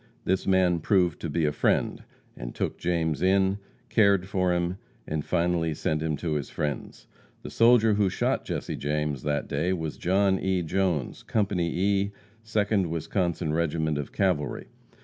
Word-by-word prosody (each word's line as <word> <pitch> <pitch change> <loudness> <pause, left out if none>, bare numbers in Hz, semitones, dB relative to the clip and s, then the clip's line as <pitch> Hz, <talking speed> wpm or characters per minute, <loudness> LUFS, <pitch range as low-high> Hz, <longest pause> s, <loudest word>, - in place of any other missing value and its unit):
This 95 +1 0
man 90 -3 +3
proved 90 -1 +2
to 85 - -4
be 80 +2 0
a 75 - +2
friend, 75 - 0 0.3
and - - -7
took - - -3
James 85 -3 0
in, 95 +1 +3 0.3
cared 100 -4 +3
for 90 -2 +1
him, 90 +1 0 0.3
and 75 -1 -3
finally 85 -2 0
sent 75 +1 -1
him 80 -2 -1
to 80 +1 -2
his 75 -4 -2
friends. 75 -1 -4 0.4
The - - -7
soldier 115 -2 +5
who 100 -2 +2
shot - - 0
Jesse - - -4
James 75 -1 -2
that 75 0 -1
day 80 +6 0
was 80 -4 -4
John 95 +1 +2
E. 95 -2 0
Jones, 85 -5 -1
Company 95 -6 0
E., 100 +2 +1 0.3
Second 105 -4 0
Wisconsin 85 0 -1
regiment 80 -2 0
of 70 - -5
cavalry. 85 -8 -1
85 Hz, 160 wpm, -27 LUFS, 80-95 Hz, 0.4 s, soldier